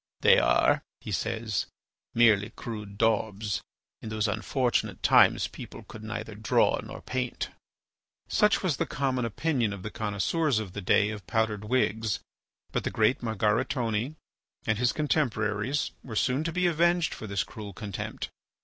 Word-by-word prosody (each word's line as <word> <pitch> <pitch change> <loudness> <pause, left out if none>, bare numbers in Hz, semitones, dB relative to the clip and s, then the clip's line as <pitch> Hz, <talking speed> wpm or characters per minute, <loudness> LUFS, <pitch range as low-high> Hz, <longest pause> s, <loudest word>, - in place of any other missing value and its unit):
"They - - +7
are," - - +4 0.2
he - - -7
says, 110 -3 -1 0.5
"merely 110 -3 +5
crude 105 -4 -7
daubs. 110 -2 +1 0.4
In 110 - -6
those 110 0 0
unfortunate 115 +4 0
times - - +5
people - - -10
could 110 - -11
neither 110 0 -5
draw 105 0 +2
nor - - -9
paint." 125 -1 -2 0.8
Such 210 -1 +3
was 170 -7 +1
the - - -1
common 130 -3 0
opinion 120 -2 0
of 95 -2 -8
the 105 - -5
connoisseurs 110 - 0
of 105 -4 -3
the 100 - -4
days 105 +3 +3
of 100 -5 -9
powdered 105 +2 0
wigs. 110 -2 +1 0.5
But - - -1
the - - -1
great 110 +3 +2
Margaritone 115 +3 0 0.5
and 110 - +1
his 125 0 +3
contemporaries 125 -4 0
were 115 -4 -7
soon 130 +6 +1
to 165 - 0
be 180 +2 +1
avenged 170 0 +3
for 110 - -7
this 100 -3 0
cruel 105 -2 -8
contempt. 100 0 -5
110 Hz, 150 wpm, -28 LUFS, 105-130 Hz, 0.8 s, They